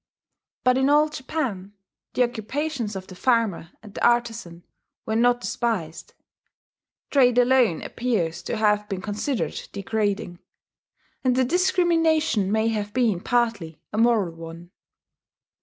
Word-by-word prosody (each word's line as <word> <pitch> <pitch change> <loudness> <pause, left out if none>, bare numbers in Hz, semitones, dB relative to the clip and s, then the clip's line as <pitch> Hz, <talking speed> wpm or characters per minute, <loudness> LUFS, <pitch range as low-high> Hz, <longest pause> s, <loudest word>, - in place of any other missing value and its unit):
But 255 +1 +3
in 265 +1 +2
Old 300 +1 +3
Japan 250 -10 -4 0.4
the 250 - +4
occupations 245 0 -3
of 190 -1 -6
the 185 - -12
farmer 220 -5 0
and 210 -2 -12
the - - -5
artizan 230 -8 0 0.4
were 220 - -2
not 245 +1 +3
despised: 225 -11 -3 1.0
trade 250 -4 +4
alone 245 -8 +3
appears 175 -9 -2
to - - -4
have 210 -1 +1
been 190 -2 -4
considered 215 +5 -2
degrading, 200 -3 -2 0.8
and 255 -2 +2
the 260 0 +3
discrimination 325 - +2
may 220 +1 +2
have 210 -2 -3
been 230 -8 +2
partly 215 -8 -1
a 215 - -1
moral 225 -7 +2
one. 165 +1 -10
225 Hz, 125 wpm, -24 LUFS, 195-255 Hz, 1.0 s, the